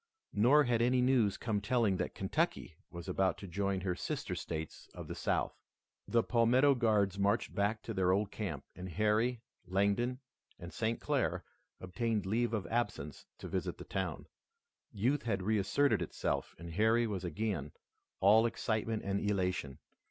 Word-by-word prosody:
Nor 125 +8 +5
had 120 -3 +1
any 125 +2 +3
news 125 -5 +3
come 110 -3 -1
telling 105 -2 +2
that - - -3
Kentucky - - -1 0.2
was 85 -1 -8
about 95 -1 +1
to 100 - -8
join 100 +1 -1
her 90 -1 -1
sister - - -3
states 80 -1 -5
of - - -7
the - - -4
South. - - -1 0.5
The 115 -1 +3
Palmetto 125 +4 +4
Guards 105 -6 +2
marched 100 +1 +1
back 100 +2 0
to 115 - -4
their 95 -2 +2
old 100 +2 +1
camp, 95 -10 -4
and 90 +1 -7
Harry, 110 +6 +1 0.2
Langdon, 100 +7 +1 0.4
and 85 -1 -9
St. 115 +1 -1
Clair - - 0 0.4
obtained 105 +3 -2
leave 115 +5 +1
of 100 -5 -3
absence 120 +7 -3
to - - -8
visit - - -3
the - - -8
town. - - -3 0.7
Youth 125 +7 +1
had 100 -5 -1
reasserted 110 +3 +2
itself 85 - -2
and 85 0 -8
Harry 110 +6 +3
was 100 -5 -3
again 85 -4 -2 0.5
all 110 +4 +6
excitement 110 -1 -2
and 100 0 -1
elation. 90 -9 -1
105 Hz, 160 wpm, -33 LUFS, 95-115 Hz, 0.7 s, all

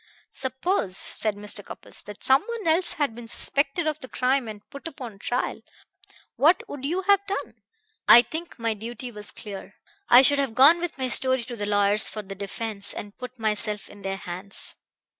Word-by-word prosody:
"Suppose," 260 - -2
said 215 -2 -1
Mr. 205 0 -3
Cupples, - - -8
"that 210 -1 -10
someone 415 - +1
else 335 +2 +4
had 285 -6 -1
been 235 0 -10
suspected 280 +7 +1
of 310 -1 -2
the 260 - -8
crime 255 0 0
and 210 -1 -10
put 280 +3 -8
upon 245 -10 -9
trial. 245 +4 -2 0.8
What 330 +6 +3
would 275 -2 -7
you 355 +6 -1
have 400 +1 +4
done?" 400 - -5 0.5
"I 240 - +9
think 320 +8 -7
my 230 -2 -1
duty 240 +4 -7
was 210 -2 -7
clear. 200 -2 -8 0.3
I 245 +2 +8
should 285 +1 +5
have 270 -5 -1
gone 290 +7 +7
with 345 -3 -4
my 260 -1 -2
story 260 0 +4
to 240 0 -7
the 205 -2 -4
lawyers 205 +1 +4
for 215 - -6
the 195 0 -8
defense, 200 +1 -1
and 205 0 -8
put 250 0 -8
myself 210 -1 -1
in 205 - -14
their 195 0 -3
hands." 185 +2 -4
240 Hz, 185 wpm, -25 LUFS, 210-285 Hz, 0.8 s, I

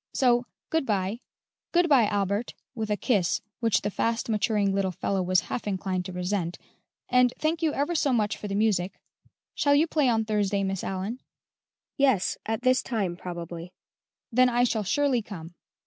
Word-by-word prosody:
So, 245 -2 +3 0.2
good 320 -2 +2
bye; 200 +1 0 0.5
good 350 0 +3
bye, 265 -8 +5
Albert 205 +2 -1 0.2
(with 220 -4 -4
a 210 - +1
kiss, 200 -9 +1 0.2
which 225 -3 +2
the 205 - -1
fast 230 +3 -1
maturing, 210 -2 +1
little 195 -1 +1
fellow 190 +2 -1
was 185 0 +3
half 210 +5 -5
inclined 190 -2 -2
to 185 - -5
resent), 180 -1 -2 0.5
and 250 -1 +4
thank 320 +2 0
you 320 -2 +2
ever 290 +5 0
so 295 -4 +2
much 215 -4 +1
for 210 - -7
the 200 - -3
music. 200 -3 +1 0.5
Shall 285 0 +3
you 300 +3 +5
play 300 -5 +2
on 220 -2 +1
Thursday, 205 -2 0
Miss 195 -1 -2
Allyn?" 195 +6 -3 0.8
"Yes; 265 -9 +3
at 225 +2 -2
this 255 0 +4
same - - -4
time, 200 -8 -1
probably." 175 0 -7 0.6
"Then 255 +2 +5
I 245 0 +2
shall 225 -3 +1
surely 270 +3 +1
come." 175 -5 -9
215 Hz, 180 wpm, -27 LUFS, 190-250 Hz, 0.8 s, bye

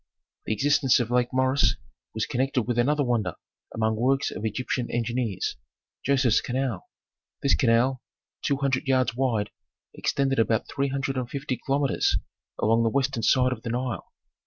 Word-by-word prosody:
The - - +1
existence 140 +3 +3
of 120 -1 -2
Lake 125 0 +2
Moeris 130 +2 +3 0.4
was 110 - 0
connected 130 0 0
with 120 +1 -1
another 145 +4 +2
wonder 115 - 0 0.4
among 110 0 0
works 135 +4 +1
of - - -6
Egyptian 120 +2 -2
engineers, 120 -3 -2 0.5
Joseph's 130 -4 +3
canal. 125 -5 -3 0.5
This 140 - +4
canal, 125 +2 +2 0.4
two 140 - 0
hundred 135 -1 0
yards 130 -3 +2
wide, 120 -5 0 0.4
extended 135 -2 0
about 110 -1 +1
three 140 0 -1
hundred 135 0 -2
and 125 -2 -2
fifty 140 -1 -3
kilometres 135 +3 +1 0.4
along 115 +2 +3
the 115 - +3
western 135 -1 0
side 125 +3 +3
of 115 - -9
the 115 - -5
Nile. 120 -4 -3
125 Hz, 155 wpm, -26 LUFS, 115-135 Hz, 0.5 s, This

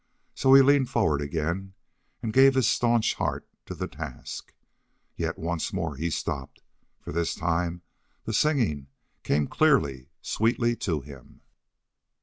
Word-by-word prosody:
So 135 0 +5
he 135 - +9
leaned 140 -1 +4
forward 75 -2 +1
again 85 +6 -3 0.5
and 110 -2 -2
gave 135 +1 +6
his 130 -3 +3
stanch 120 -2 +2
heart - - -3 0.2
to - - -6
the - - -4
task. - - -8 0.6
Yet - - -3
once 85 +1 -3
more 85 -7 -3
he 80 +5 -2
stopped, 70 -4 -4 0.4
for - - -8
this 85 +1 -1
time 85 +1 -1 0.4
the 110 - -4
singing 105 - +1 0.3
came 75 +1 +1
clearly, 70 - +1
sweetly 120 +1 +1
to 80 -6 -2
him. 70 -2 -14
85 Hz, 135 wpm, -26 LUFS, 75-120 Hz, 0.6 s, he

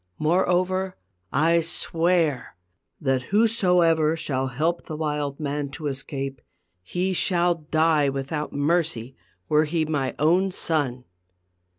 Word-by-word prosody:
Moreover, 185 +3 +1 0.3
I 165 +4 +3
swear 165 - 0 0.4
that 135 -2 +1
whosoever 180 -7 +3
shall 135 -4 -2
help 155 +7 -1
the 155 - -5
wild 150 -2 -2
man 145 -1 -2
to 155 - -8
escape, 135 -1 -4 0.4
he 180 - -2
shall 175 -1 +2
die 155 -2 +2
without 140 +3 -3
mercy, 145 -5 0 0.3
were 155 +1 +3
he 160 +1 0
my 145 -4 -2
own 175 +6 +3
son." 140 -8 -1
155 Hz, 110 wpm, -24 LUFS, 140-175 Hz, 0.4 s, I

